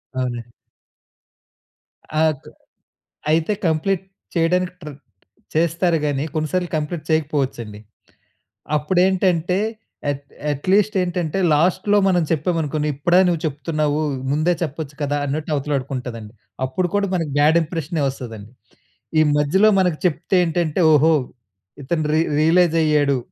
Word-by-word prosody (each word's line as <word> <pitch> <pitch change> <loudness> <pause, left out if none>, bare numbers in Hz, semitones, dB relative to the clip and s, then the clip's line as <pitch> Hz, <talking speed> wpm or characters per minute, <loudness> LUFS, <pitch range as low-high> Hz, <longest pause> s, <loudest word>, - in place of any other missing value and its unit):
అవునండి. 120 -2 -3 1.8
ఆగ్ 155 -4 -2 0.8
అయితే 165 +6 +2
కంప్లీట్ 180 +4 0 0.3
చేయడానికి 180 +2 +1
ట్రె 150 -1 -7 0.6
చేస్తారు 170 +1 +2
కానీ 145 -1 0
కొన్నిసార్లు 170 +3 -1
కంప్లీట్ 155 +1 -4
చేయకపోవచ్చండి. 135 -9 -1 1.0
అప్పుడేంటంటే 180 +2 +1 0.5
అట్ 140 0 -3 0.3
అట్లీస్ట్ 195 +8 +1
ఏంటంటే 175 -1 -2 0.2
లాస్ట్‌లో 185 +6 +2
మనం 175 -3 +3
చెప్పామనుకోండి 155 -2 0
"ఇప్పుడా 175 +5 +3
నువ్వు 170 -3 +1
చెప్తున్నావు 150 0 -1 0.3
ముందే 155 +4 +2
చెప్పొచ్చు 150 -1 -5
కదా!" 145 0 0
అన్నట్టు 150 +3 -3
అవతలాడుకుంటుందండి. 130 -6 -4 0.3
అప్పుడు 175 +8 -1
కూడా 200 -1 +1
మనకి 165 -5 -2
బ్యాడ్ 155 +3 +5
ఇంప్రెషనే 160 -1 -3
వస్తదండి. 115 -5 -8 0.7
ఈ - - +6 0.2
మధ్యలో 190 +9 +4
మనకు 180 -4 +1
చెప్తే 175 +2 +1
ఏంటంటే 165 0 0
"ఓహో! 160 +2 +5 0.7
ఇతను 155 +3 -1
రి 160 - +3 0.2
రియలైజ్ 165 +1 +4
అయ్యాడు. 145 -3 +2
155 Hz, 110 wpm, -21 LUFS, 145-175 Hz, 1.8 s, ఈ